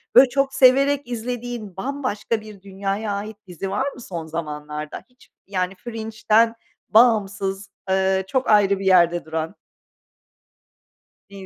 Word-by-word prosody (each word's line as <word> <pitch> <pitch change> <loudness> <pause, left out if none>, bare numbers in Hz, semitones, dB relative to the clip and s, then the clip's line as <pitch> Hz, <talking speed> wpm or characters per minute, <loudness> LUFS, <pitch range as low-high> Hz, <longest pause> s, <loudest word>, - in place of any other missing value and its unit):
Böyle, 255 +2 +8
çok 275 +1 0
severek 275 +1 +4
izlediğin, 240 -4 -5
bambaşka 245 -3 -2
bir 215 -2 -12
dünyaya 195 +2 -3
ait 205 +1 -5
dizi 180 +2 -5
var 260 +8 -1
mı - - -12
son 170 -7 -6
zamanlarda 150 -1 -6
hiç, 250 0 -24 0.2
yani, 185 -1 -2
Fringe'ten 225 +1 +1 0.3
bağımsız, 205 -4 +2 0.2
eee, 190 0 +2
çok 260 +4 -1
ayrı 200 -2 +4
bir 195 - -5
yerde 175 -3 +4
duran? 160 +3 -4 1.7
İyi. 195 -1 -10
205 Hz, 125 wpm, -22 LUFS, 190-240 Hz, 1.7 s, Böyle